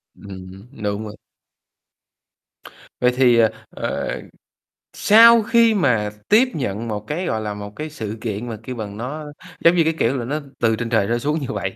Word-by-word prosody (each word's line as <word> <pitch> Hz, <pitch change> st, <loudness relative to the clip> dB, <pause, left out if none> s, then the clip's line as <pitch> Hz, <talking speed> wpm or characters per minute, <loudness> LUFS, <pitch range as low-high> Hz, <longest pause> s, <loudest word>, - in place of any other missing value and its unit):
Ừm, 95 Hz, +1 st, -11 dB, 0.2 s
đúng 105 Hz, +1 st, -2 dB
vậy. 105 Hz, 0 st, -8 dB, 1.9 s
Vậy 125 Hz, 0 st, +4 dB
thì, 125 Hz, -2 st, +4 dB
ờ, 115 Hz, -1 st, +5 dB, 0.2 s
ờ, -, -, -4 dB, 0.7 s
sau 230 Hz, +2 st, +7 dB
khi 230 Hz, 0 st, +4 dB
mà 125 Hz, -, +1 dB, 0.2 s
tiếp 230 Hz, +5 st, +5 dB
nhận 115 Hz, -5 st, -3 dB
một 105 Hz, -1 st, -5 dB
cái, 170 Hz, +5 st, -3 dB
gọi 110 Hz, -9 st, -1 dB
là, 105 Hz, -1 st, -4 dB
một 105 Hz, 0 st, -7 dB
cái 155 Hz, +5 st, -5 dB
sự 110 Hz, -8 st, -6 dB
kiện 115 Hz, +1 st, -4 dB
mà, 110 Hz, -, -5 dB
kêu 125 Hz, -, -6 dB
bằng, 105 Hz, -3 st, -6 dB
nó 145 Hz, +7 st, -5 dB, 0.4 s
giống 170 Hz, +1 st, +7 dB
như, 170 Hz, -, +4 dB
cái 160 Hz, +1 st, +1 dB
kiểu 130 Hz, +4 st, +1 dB
là, 120 Hz, -, -4 dB
nó 145 Hz, +5 st, -2 dB, 0.2 s
từ 115 Hz, -1 st, +2 dB
trên 115 Hz, +1 st, -4 dB
trời 110 Hz, -4 st, +2 dB
trở 120 Hz, +1 st, +1 dB
xuống 150 Hz, +5 st, -1 dB
như 140 Hz, -, -5 dB
vậy, 95 Hz, -2 st, -3 dB
120 Hz, 190 wpm, -21 LUFS, 105-150 Hz, 1.9 s, sau